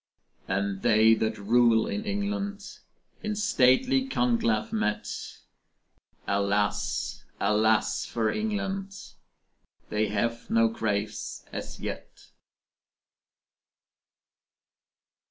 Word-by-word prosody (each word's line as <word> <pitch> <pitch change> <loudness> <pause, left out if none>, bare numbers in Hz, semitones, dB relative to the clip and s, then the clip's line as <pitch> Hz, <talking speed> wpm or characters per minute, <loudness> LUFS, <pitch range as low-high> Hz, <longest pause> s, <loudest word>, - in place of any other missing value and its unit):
And 100 0 -1
they 110 +1 +5
that 110 0 0
rule 115 +2 +4
in 210 +1 -3
England, 205 0 -3 0.4
In 215 -1 -2
stately 215 - +3
conclave 235 -2 +1
met, 105 - -2 0.9
Alas, 100 +1 0 0.2
alas 110 0 +2
for 110 -2 -1
England 195 -2 -3 0.9
They 105 0 +1
have 115 +3 -2
no 115 0 +4
graves 105 -2 -3
as - - -6
yet. - - -7
115 Hz, 80 wpm, -27 LUFS, -, 0.9 s, they